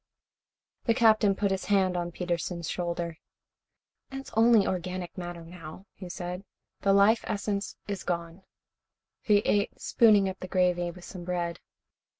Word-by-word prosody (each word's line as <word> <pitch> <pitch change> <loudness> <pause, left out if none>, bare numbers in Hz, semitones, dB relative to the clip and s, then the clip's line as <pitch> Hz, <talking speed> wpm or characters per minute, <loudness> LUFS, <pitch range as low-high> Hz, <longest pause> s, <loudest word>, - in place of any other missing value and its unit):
The 230 - +3
Captain 215 -3 +4
put 200 0 0
his 190 -1 -2
hand 190 -3 +2
on 175 0 -2
Peterson's 170 -1 -3
shoulder. 170 -2 -3 0.9
"It 270 - -6
is - - -13
only 225 -2 +5
organic 180 -1 -3
matter, 175 -2 -7
now," 165 +1 -10
he 185 -2 -9
said. 180 +1 -5 0.4
"The 200 - +2
life 200 +3 +5
essence 200 0 -2
is 200 -2 -4
gone." 170 +1 -3 0.8
He 205 -2 +4
ate, 205 -1 +1
spooning 210 -4 +4
up 190 0 -5
the 185 - -6
gravy 180 -1 +1
with 175 +1 -11
some 180 -2 -8
bread. 175 -1 -2
185 Hz, 150 wpm, -28 LUFS, 175-200 Hz, 0.9 s, only